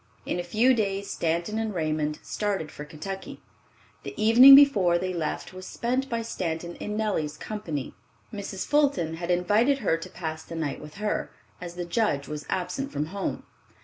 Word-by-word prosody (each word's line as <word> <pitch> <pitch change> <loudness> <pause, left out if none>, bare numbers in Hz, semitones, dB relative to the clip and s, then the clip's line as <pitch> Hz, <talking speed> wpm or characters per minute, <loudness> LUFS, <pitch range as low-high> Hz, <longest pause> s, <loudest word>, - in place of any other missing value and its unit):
In - - -2
a - - -2
few 220 +9 +3
days 200 -3 -1
Stanton 170 +6 -1
and 220 -3 -2
Raymond 155 -2 -1
started 195 -7 -2
for 150 - -8
Kentucky. 165 +6 -7 0.6
The - - -8
evening 240 +6 +10
before 205 -12 +6
they 185 +1 -2
left 165 +1 -3
was 185 0 -9
spent 255 +3 -1
by 230 -1 -1
Stanton 170 -6 -4
in 210 0 -4
Nellie's 195 -9 -1
company. 170 -11 -5 0.4
Mrs. 195 -2 -5
Fulton 275 - +1
had 170 +1 -5
invited 210 +10 +3
her 165 -11 +1
to 165 +2 -8
pass 160 -3 -5
the 165 - -9
night 155 -4 -3
with 150 - -11
her, 210 +1 -2 0.3
as 175 -1 -7
the 175 0 -4
Judge 170 -7 0
was 150 0 -6
absent 270 +10 -2
from 145 +1 -2
home. 200 - -3
185 Hz, 175 wpm, -26 LUFS, 160-215 Hz, 0.6 s, evening